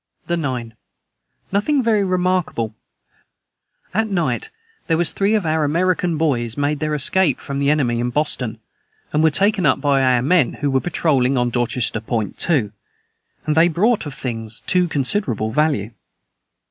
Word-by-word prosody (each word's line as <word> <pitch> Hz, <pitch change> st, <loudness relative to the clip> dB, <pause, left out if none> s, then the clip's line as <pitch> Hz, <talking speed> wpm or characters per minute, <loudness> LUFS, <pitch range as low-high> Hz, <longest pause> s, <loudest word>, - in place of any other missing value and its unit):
the 170 Hz, -, -1 dB
9. 125 Hz, -8 st, -3 dB, 0.8 s
Nothing 255 Hz, +8 st, +1 dB
very 220 Hz, -3 st, +2 dB
remarkable 180 Hz, -, 0 dB, 1.2 s
at 220 Hz, +2 st, 0 dB
night 195 Hz, -, -1 dB, 0.4 s
their 165 Hz, -, +2 dB
was 170 Hz, -2 st, +2 dB
thre 200 Hz, +5 st, +1 dB
of 200 Hz, -, -3 dB
our 160 Hz, 0 st, +1 dB
Amarican 175 Hz, +1 st, +1 dB
Boys 120 Hz, -7 st, 0 dB
made 145 Hz, +1 st, 0 dB
their 155 Hz, 0 st, -1 dB
escape 150 Hz, +1 st, +2 dB
from 140 Hz, 0 st, -5 dB
the 140 Hz, 0 st, +2 dB
Enemy 130 Hz, -6 st, +1 dB
in 120 Hz, +1 st, -1 dB
Boston 125 Hz, -5 st, -2 dB, 0.5 s
and 150 Hz, -, +2 dB
were 160 Hz, -, +5 dB
taken 195 Hz, +5 st, +1 dB
up -, -, +3 dB
by 140 Hz, -2 st, +2 dB
our 125 Hz, -2 st, +3 dB
men 150 Hz, -2 st, +3 dB
who 145 Hz, -2 st, -2 dB
were 135 Hz, 0 st, +2 dB
Patroling 140 Hz, -7 st, +1 dB
on 125 Hz, -1 st, +1 dB
Dorchester 120 Hz, -2 st, 0 dB
Point 110 Hz, -3 st, -3 dB
to 135 Hz, -, +1 dB, 0.7 s
and 155 Hz, -, +1 dB
they 165 Hz, +2 st, +5 dB
brought 195 Hz, +2 st, +1 dB
of 145 Hz, -, -7 dB
things 115 Hz, -3 st, -5 dB
to 180 Hz, -1 st, +2 dB
considerable 130 Hz, -, 0 dB
value. 140 Hz, -6 st, 0 dB
150 Hz, 160 wpm, -20 LUFS, 125-180 Hz, 1.2 s, were